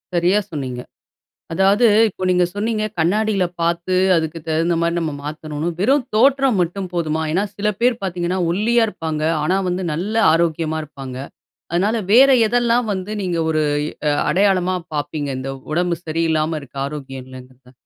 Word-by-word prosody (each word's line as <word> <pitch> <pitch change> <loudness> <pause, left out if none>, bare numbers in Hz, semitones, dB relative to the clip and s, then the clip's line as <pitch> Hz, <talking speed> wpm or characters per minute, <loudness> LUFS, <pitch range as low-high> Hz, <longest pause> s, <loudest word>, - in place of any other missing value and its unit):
சரியா 180 +4 +3
சொன்னீங்க. 130 -5 -4 0.7
அதாவது 195 +6 +4 0.2
இப்போ 185 -1 -6
நீங்க 180 0 +3
சொன்னீங்க, 215 +1 -1 0.2
கண்ணாடில 200 +3 +1 0.2
பாத்து 170 +2 0 0.2
அதுக்கு 160 0 -2
தகுந்த 165 +2 +1
மாரி 170 0 +1
நம்ம 160 -3 -2
மாத்தணுன்னு, 155 +1 -4
வெறும் 265 +5 +3
தோற்றம் 265 -2 +3
மட்டும் 180 +2 -2
போதுமா. 160 -2 -1
ஏன்னா 195 +4 +1
சில 210 +1 0
பேர் 240 -1 +2
பாத்தீங்கன்னா 180 0 -2
ஒல்லியா 225 +5 +2
இருப்பாங்க, 160 -5 -4 0.2
ஆனா 185 +5 +1
வந்து 180 +1 -2
நல்ல 190 +8 -3 0.2
ஆரோக்கியமா 160 -1 0
இருப்பாங்க, 135 -3 -9 0.6
அதனால 200 +6 +1 0.2
வேற 270 +4 +7 0.2
எதெல்லாம் 240 0 +2
வந்து 190 +2 -4
நீங்க 175 -2 -1
ஒரு 155 -1 +1 0.3
எ - - -7 0.2
அ - - +3 0.2
அடையாளமா 185 -1 +2 0.2
பாப்பீங்க? 145 0 -3
இந்த 135 +1 -4 0.2
உடம்பு 175 +1 0
சரியில்லாம 160 0 0
இருக்க 140 0 -15
ஆரோக்கியம் 135 -3 -7
இல்லங்குறத? 130 0 -14
175 Hz, 150 wpm, -20 LUFS, 155-205 Hz, 0.7 s, வேற